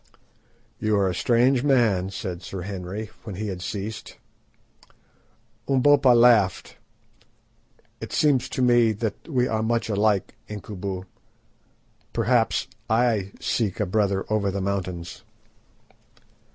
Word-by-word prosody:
"You 110 -1 +1
are 100 -1 +2
a 90 - -1
strange 120 +5 +2
man," 115 -9 +2
said 95 -3 -5
Sir 95 -2 -6
Henry, 100 +3 -6
when 105 - -7
he 105 +2 -4
had 90 -2 -5
ceased. 105 +3 -6 1.5
Umbopa 135 -1 +5
laughed. 115 -6 +3 1.2
"It - - -7
seems 145 -5 +2
to 130 - -1
me 120 -2 +4
that 110 0 -5
we 125 -4 +1
are 110 -2 -1
much 115 +1 0
alike, 105 -1 +1 0.2
Incubu. 100 -2 -5 1.1
Perhaps - - +1 0.2
I 110 -4 +1
seek 110 -3 -1
a 105 - +1
brother 100 0 0
over 105 -2 0
the 100 +1 -3
mountains." 95 -3 -4
105 Hz, 115 wpm, -24 LUFS, 95-120 Hz, 1.5 s, Umbopa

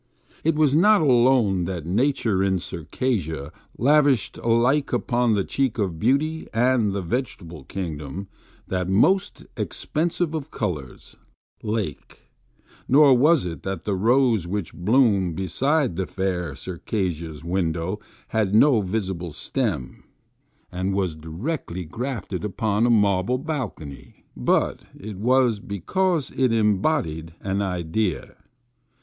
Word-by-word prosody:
It 160 0 +2
was 150 -3 +3
not 205 +5 +5
alone 120 - +3
that 85 -4 -4
Nature 110 - +1
in 95 -1 +2
Circassia 80 - -3 0.3
lavished 140 0 +3
alike 120 +5 +2
upon 120 -2 +1
the 100 - +1
cheek 135 0 -1
of 95 -7 -2
beauty 150 - +1
and 120 -3 +3
the 100 -1 -3
vegetable 85 - -4
kingdom 85 0 -5 0.4
that 90 -1 -2
most 180 - +2
expensive 165 +1 -2
of 155 -2 -4
colors, 80 - -5 0.4
Lake; 105 -9 -4 0.7
nor 140 0 +6
was 150 - +4
it 85 -2 -5
that 95 -3 -4
the 105 - -1
rose 115 -1 +2
which 100 -1 -3
bloomed 100 - +2
beside 130 - 0
the 95 +1 -2
fair 90 -6 -2
Circassian's 85 -1 -4
window 85 +2 -1 0.3
had 105 -2 +1
no 120 -1 +5
visible 95 -4 -3
stem, 95 - -3 0.7
and 95 +2 -2
was 95 -5 -1
directly 90 - -5
grafted 110 - -4
upon 105 +2 0
a - - +2
mar 100 -5 +3
ble 125 +6 0
balcony; 125 - -6
but - - +1 0.2
it 105 0 -7
was 120 0 +2
because 155 - -1
it 130 -2 +2
embodied 105 - 0
an 95 +1 -1
idea. 90 0 -2
105 Hz, 120 wpm, -24 LUFS, 90-130 Hz, 0.7 s, nor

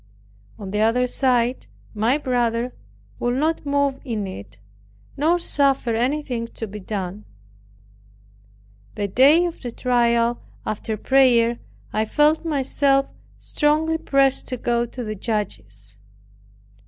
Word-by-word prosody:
On 195 -2 -7
the 210 - -1
other 230 +3 +3
side, 250 -1 0 0.3
my 225 +6 +2
brother 245 -3 -1 0.5
would 245 0 0
not 310 +2 0
move 280 -1 +1
in 225 -6 -3
it, 100 - -9 0.6
nor 320 +5 +2
suffer 275 -7 +1
anything 245 0 -1
to 225 - -4
be 210 0 -8
done. 195 0 -5 1.7
The 205 - -1
day 280 - +5
of 340 -1 -5
the 245 - -5
trial, 235 -1 +1 0.2
after 215 +1 -3
prayer, 240 -2 +3 0.3
I 215 - +1
felt 300 +7 +2
myself 275 -2 +1 0.3
strongly 315 +2 +1
pressed 275 -2 +2
to 255 - -3
go 240 0 0
to 245 +1 -7
the 215 -1 -4
judges. 105 - -4
245 Hz, 120 wpm, -22 LUFS, 220-275 Hz, 1.7 s, day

